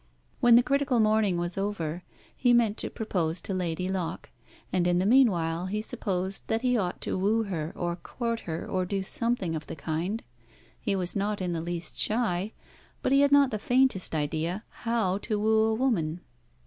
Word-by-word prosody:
When 240 -1 +6
the 240 - +7
critical 275 -1 +1
morning 215 -4 +3
was 175 +2 -2
over 180 -5 -2 0.3
he 245 -2 +3
meant 230 -3 +3
to - - -2
propose 175 -6 -1
to 195 - -3
Lady 180 -1 -2
Locke, 185 -3 -3 0.4
and 180 -1 +2
in 175 0 +3
the 185 - +1
meanwhile 185 -8 +3
he 210 +3 -2
supposed 190 -3 -3
that 225 +2 0
he 250 -1 +3
ought 185 -6 -1
to - - -2
woo 215 +4 +2
her, 165 -6 -3
or 175 -1 -2
court 230 +5 -3
her, 160 - -4
or 185 -1 0
do 195 +1 -2
something 205 -5 -1
of 155 - -6
the - - -6
kind. 170 +8 -3 0.6
He 200 - -1
was 180 -2 0
not 205 +1 -1
in 180 -2 -2
the 165 - -2
least 170 0 -5
shy, 210 -3 0 0.5
but - - +1
he 275 +1 +6
had 285 0 +4
not 280 -2 +5
the 215 - -2
faintest 250 -8 +2
idea 160 +6 -1
how 220 -5 -1
to 210 -1 -2
woo 220 +1 +3
a 220 0 +1
woman. 180 -10 0
195 Hz, 190 wpm, -28 LUFS, 175-225 Hz, 0.6 s, the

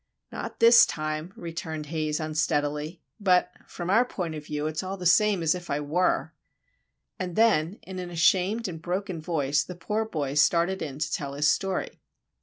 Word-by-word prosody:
"Not - - -6
this 230 +1 +8
time," 155 +2 -4
returned 165 -2 -5
Haze, 155 0 -2
unsteadily, 150 +1 -1 0.2
"but, 185 -3 +3 0.2
from 175 +1 -4
our 225 +4 +5
point 180 -9 -4
of 155 -1 -6
view, 150 0 -3
it's 155 0 -2
all 190 +1 -5
the 180 - -7
same 195 +1 +4
as 155 - +3
if 180 -1 -8
I 140 - 0
were." 155 +5 0 0.9
And 180 -2 -4
then, 195 -7 +3
in 185 0 -7
an 180 -1 -5
ashamed 185 +6 +2
and 165 -3 -7
broken 180 0 -3
voice, 150 -3 0
the 180 - -8
poor 210 +6 -2
boy 145 -9 -3
started 170 +5 +2
in 140 -4 -5
to 150 - -2
tell 140 -1 -3
his 150 +2 +2
story. 190 +3 -1
170 Hz, 180 wpm, -26 LUFS, 155-185 Hz, 0.9 s, this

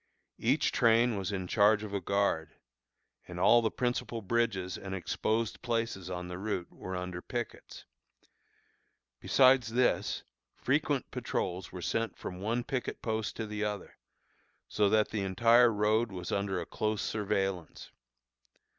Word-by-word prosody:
Each - - +2
train 115 0 +4
was 95 -1 -3
in 95 -2 -3
charge 105 +3 +4
of 105 -2 -6
a 100 - -1
guard, 100 -4 0 0.7
and 90 0 -7
all 120 +6 +6
the 110 - +1
principal 120 -2 -2
bridges 100 -4 0
and 95 -1 -5
exposed 110 +4 -1
places 115 -6 -2
on 90 -1 -4
the 90 0 -6
route 95 -4 -3
were 95 - -6
under 90 -1 -4
pickets. 120 +3 -6 1.3
Besides 130 -4 +4
this, 125 +1 +1 0.3
frequent - - 0
patrols 90 0 -3
were 90 -1 -7
sent 115 +5 -1
from 90 - -7
one 115 +4 -1
picket 130 -1 -4
post 110 -1 -2
to 115 - -3
the 105 0 -4
other, 105 -2 -4 0.7
so 105 -1 +2
that 110 0 +3
the 105 - -2
entire 115 +5 +5
road 110 +2 +1
was 90 -2 -6
under 100 -2 -1
a 85 - -4
close 110 +3 -2
surveillance. 95 -5 -2
105 Hz, 145 wpm, -31 LUFS, 95-115 Hz, 1.3 s, all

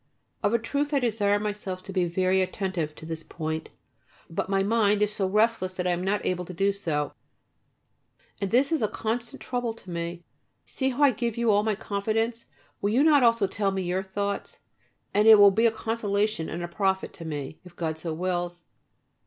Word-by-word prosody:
Of 205 - +2
a - - +5
truth 285 +6 -1
I - - +4
desire 210 -4 +2
myself 205 -3 -4
to 195 - -8
be 185 -2 +2
very 185 +2 +2
attentive 185 -5 -2
to 160 - -11
this 160 0 -5
point, 160 -1 -4 0.6
but 165 - -2
my 195 0 +2
mind 210 -1 +3
is 210 0 0
so 195 -2 0
restless 210 -2 +1
that 180 - -3
I 180 - +2
am 175 +1 -1
not 200 +1 0
able 180 -1 0
to 180 - -9
do 195 +3 +2
so, 155 -7 -2 1.3
and 200 - -1
this 260 - +3
is 320 - +1
a 215 - +2
constant 230 +2 -4
trouble 245 -3 -2
to 190 -5 -12
me. 170 0 -4 0.4
See 265 -1 -1
how 265 +3 0
I 280 - +7
give 235 -1 -3
you 235 -2 +3
all 205 0 +4
my 215 -1 0
confidence. 220 +3 -1 0.3
Will 200 - +1
you 245 +7 +3
not 300 -3 +6
also 230 -3 +4
tell 195 +1 -1
me 190 -1 -2
your 180 +1 -1
thoughts, 200 +1 -4 0.5
and 210 +2 +4
it 220 -1 +10
will 200 -1 +8
be 225 +4 +4
a - - +2
consolation 215 -5 -1
and 175 +2 -4
a - - -3
profit 190 +1 -1
to 170 - -10
me, 150 -1 -5
if 180 -1 -15
God 160 -2 -3
so 165 0 -4
wills. 175 +1 -2
200 Hz, 205 wpm, -26 LUFS, 180-225 Hz, 1.3 s, it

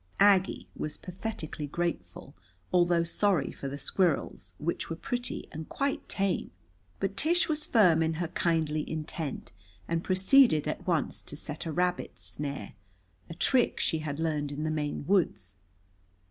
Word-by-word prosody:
Aggie 195 -1 +4
was 155 - -4
pathetically 180 -5 -5
grateful, 145 - -4 0.4
although 175 -1 +4
sorry 175 -2 +1
for 140 - -6
the 140 +1 -4
squirrels, 160 +3 0
which 170 +3 -2
were 165 - -2
pretty 245 +5 -3
and 160 0 -7
quite 280 0 -2
tame. 195 -1 0 0.5
But 195 0 -1
Tish 335 - +3
was 305 -1 -1
firm 180 -8 +5
in 160 0 +1
her 170 0 -2
kindly 160 -3 0
intent, 155 -2 -4 0.4
and 165 0 -1
proceeded 185 - +5
at 150 - -4
once 170 -4 0
to 145 - -7
set 155 +1 -5
a - - -2
rabbit 180 +2 -1
snare, 140 -8 -5 0.6
a 165 - -7
trick 250 +6 +3
she 160 - +1
had 150 -2 -4
learned 150 -3 -1
in 145 +1 -4
the 155 - 0
Maine 150 -2 -2
woods. 170 - +1
165 Hz, 150 wpm, -29 LUFS, 150-190 Hz, 0.6 s, firm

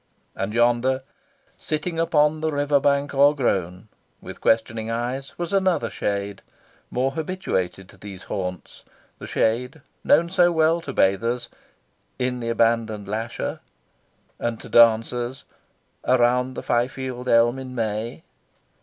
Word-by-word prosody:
And 100 +3 -3
yonder, 120 +3 +2 0.6
"sitting 160 +2 -3
upon 155 -2 +2
the 160 0 0
river 145 0 +2
bank 140 +1 +1
o'ergrown," 115 - +2 0.3
with - - -10
questioning 110 0 +1
eyes, 125 +4 -4
was 175 +1 -4
another 185 - +1
shade, 100 0 -3 0.5
more 130 +2 0
habituated 140 - -3
to - - -16
these 95 -1 -10
haunts 90 -2 -6 0.4
the - - -8
shade 125 +7 0 0.2
known 170 +1 +3
so 175 -2 +4
well 160 +1 +2
to 145 - -6
bathers 115 +3 +1 0.7
"in 125 0 -1
the 115 -1 -3
abandoned 115 -3 +1
lasher," 110 +3 -3 0.8
and 120 -1 -2
to - - -11
dancers 120 +2 +3 0.6
"around 125 +1 +2
the - - -5
Fyfield 125 +1 -2
elm 120 +2 +4
in 130 -1 -8
May." 110 0 -3
120 Hz, 125 wpm, -23 LUFS, 110-140 Hz, 0.8 s, so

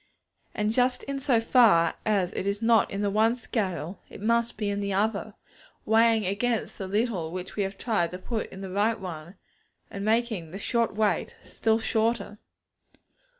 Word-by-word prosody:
And 210 0 0
just 250 +2 +2
in 275 0 -4
so 255 -4 +2
far 225 -8 +5
as 195 -4 +1
it 195 - -3
is 200 +1 0
not 225 -2 +4
in 200 +1 -3
the 200 - +1
one 220 +3 +3
scale, 195 -7 -3
it - - -11
must 235 +2 +1
be 210 - -2
in 200 0 -1
the 200 0 -2
other; 210 +1 -1 0.5
weighing 225 -1 +4
against 225 +4 -1
the 190 - -4
little 200 -5 -1
which 185 +1 -6
we 210 - -1
have 195 0 -3
tried 205 -8 0
to 180 - -6
put 220 +4 -4
in 190 - -9
the 190 -1 -6
right 210 +3 +1
one, 175 -1 -7 0.6
and 200 - -5
making 220 -6 0
the 185 - -7
short 230 +1 0
weight 215 -1 0
still 220 -1 +1
shorter. 220 -2 -1
210 Hz, 180 wpm, -27 LUFS, 195-230 Hz, 0.6 s, far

